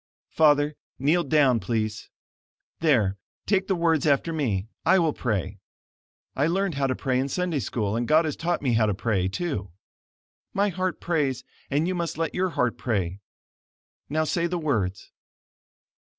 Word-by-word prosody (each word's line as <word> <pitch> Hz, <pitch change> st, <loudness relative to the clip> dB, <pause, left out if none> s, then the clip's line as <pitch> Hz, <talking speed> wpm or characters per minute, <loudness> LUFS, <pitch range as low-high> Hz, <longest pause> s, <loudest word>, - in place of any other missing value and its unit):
"Father, 150 Hz, -1 st, +4 dB, 0.2 s
kneel 155 Hz, +6 st, +2 dB
down, 140 Hz, -7 st, +3 dB
please. 110 Hz, -2 st, -2 dB, 0.7 s
There, 110 Hz, -, +2 dB, 0.3 s
take 195 Hz, -2 st, +1 dB
the 190 Hz, -, +1 dB
words 165 Hz, -3 st, +2 dB
after 145 Hz, +3 st, +2 dB
me. 110 Hz, -11 st, -1 dB, 0.2 s
I 190 Hz, +3 st, +5 dB
will 165 Hz, -4 st, +2 dB
pray 100 Hz, -4 st, -2 dB, 0.8 s
I 140 Hz, +3 st, +2 dB
learned 190 Hz, +1 st, 0 dB
how 140 Hz, -1 st, 0 dB
to 130 Hz, -, 0 dB
pray 130 Hz, -2 st, 0 dB
in 135 Hz, +1 st, -1 dB
Sunday 175 Hz, 0 st, -1 dB
School 105 Hz, -2 st, -2 dB
and 120 Hz, +1 st, -1 dB
God 160 Hz, +2 st, +4 dB
has 155 Hz, -, -2 dB
taught 170 Hz, -2 st, -1 dB
me 125 Hz, -4 st, +2 dB
how 110 Hz, -1 st, +3 dB
to 105 Hz, -, 0 dB
pray, 100 Hz, -3 st, 0 dB
too; 100 Hz, -, -3 dB, 0.9 s
my 200 Hz, +1 st, +2 dB
heart 185 Hz, 0 st, -2 dB
prays, 145 Hz, -7 st, 0 dB, 0.3 s
and 150 Hz, +4 st, +1 dB
you 185 Hz, -, 0 dB
must 170 Hz, -4 st, -3 dB
let 165 Hz, -1 st, -1 dB
your 185 Hz, +1 st, 0 dB
heart 125 Hz, -7 st, -1 dB
pray. 95 Hz, -6 st, -1 dB, 0.9 s
Now 155 Hz, +2 st, +1 dB
say 170 Hz, +2 st, 0 dB
the 175 Hz, +1 st, -2 dB
words." 105 Hz, -, -2 dB
145 Hz, 165 wpm, -25 LUFS, 115-170 Hz, 0.9 s, I